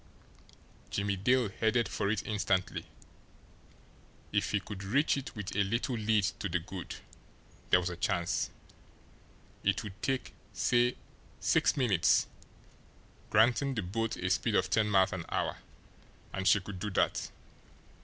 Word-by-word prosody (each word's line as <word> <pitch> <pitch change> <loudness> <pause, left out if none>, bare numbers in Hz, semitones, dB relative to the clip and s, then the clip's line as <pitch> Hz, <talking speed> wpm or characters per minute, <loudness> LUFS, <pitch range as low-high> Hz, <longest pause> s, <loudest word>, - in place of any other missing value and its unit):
Jimmie 100 0 0
Dale 120 +4 +2
headed 110 +4 +1
for 100 - -1
it 105 -2 -1
instantly. 95 -3 -1 1.4
If - - +1
he 105 - +1
could 100 0 -8
reach 140 +10 +2
it 140 -2 -6
with 105 -3 -5
a 100 - +3
little 115 +5 -1
lead 110 -1 +2 0.2
to 100 - -2
the 90 - +1
good, 90 +1 -7 0.7
there 90 - +6
was 90 0 -2
a - - -5
chance! 90 +1 0 1.1
It - - +1
would 105 -3 -6
take, 135 -1 -1 0.2
say, 120 0 +2 0.4
six - - +2
minutes, 110 -10 +3 1.0
granting 125 +5 +3
the 105 - -1
boat 115 +5 -2
a 90 - -2
speed 105 +2 +1
of 95 - +2
ten 105 +1 +3
miles 95 -1 +4
an 90 -3 -3
hour - - -1 0.8
and 95 0 -1
she 100 - +6
could 95 0 -8
do 105 - -2
that. 95 - 0
105 Hz, 145 wpm, -31 LUFS, 95-115 Hz, 1.4 s, there